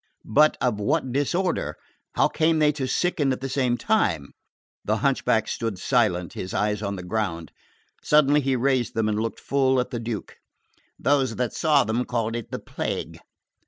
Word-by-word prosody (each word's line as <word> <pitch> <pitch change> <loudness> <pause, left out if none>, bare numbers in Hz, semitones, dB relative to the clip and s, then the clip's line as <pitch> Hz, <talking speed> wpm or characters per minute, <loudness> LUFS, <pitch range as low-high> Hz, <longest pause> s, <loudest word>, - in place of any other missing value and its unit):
"But 150 +8 +4
of 120 -4 0
what 130 +4 0
disorder? 145 - -1 0.4
How - - +4
came 160 0 +1
they 150 -1 +4
to 140 -3 -3
sicken 150 -3 +1
at 130 - -2
the 135 - -4
same 125 -3 0
time?" 90 - 0 0.5
The - - 0
hunchback - - +2
stood 115 -4 -3
silent, 90 -5 +1
his 90 - -5
eyes 105 0 0
on 100 -1 -2
the 90 - -7
ground. 90 -4 -3 0.5
Suddenly 150 0 +4
he 135 -1 0
raised 130 -1 0
them 110 -1 +1
and 105 0 0
looked 115 0 -3
full 130 -2 +2
at 125 - -2
the 120 - -3
Duke. 115 -2 -5 0.6
"Those 135 0 +1
that 125 -2 -2
saw 150 -4 +3
them 115 +3 -1
called 115 -2 -2
it 120 - -5
the - - -4
plague." - - -5
125 Hz, 175 wpm, -24 LUFS, 110-140 Hz, 0.6 s, But